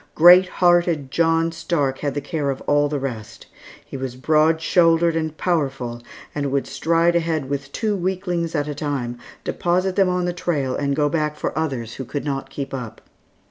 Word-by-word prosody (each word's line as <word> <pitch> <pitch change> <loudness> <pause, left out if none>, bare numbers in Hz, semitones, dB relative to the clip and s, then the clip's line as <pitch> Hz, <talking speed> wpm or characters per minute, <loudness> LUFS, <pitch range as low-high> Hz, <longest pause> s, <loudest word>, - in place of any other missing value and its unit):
Great 180 +3 +8
hearted 175 -6 +2
John 165 +1 +2
Stark 165 -5 -1
had 145 -2 -2
the 145 - -1
care 150 -4 -2
of 135 - -2
all 145 0 +2
the 150 - -1
rest. 120 -6 -6 0.4
He - - -10
was 130 -2 -5
broad 155 +4 +3
shouldered 165 0 +3
and 160 -1 -2
powerful, 135 -8 -1 0.3
and 140 -2 -2
would 140 0 0
stride 170 +1 +1
ahead 165 -4 0
with 140 0 -4
two 215 +4 -1
weaklings 180 -3 -2
at 145 -1 0
a 150 - -3
time, 135 -5 -3 0.2
deposit 180 +2 0
them 195 -2 +3
on 180 0 0
the 175 - -1
trail 145 -7 -1
and 140 -1 -1
go 150 0 +2
back 150 -1 -1
for - - -4
others 135 -7 -2
who 135 - -6
could 145 +4 -5
not 135 -2 -3
keep 135 0 -6
up. 125 -5 -6
155 Hz, 185 wpm, -22 LUFS, 135-170 Hz, 0.4 s, Great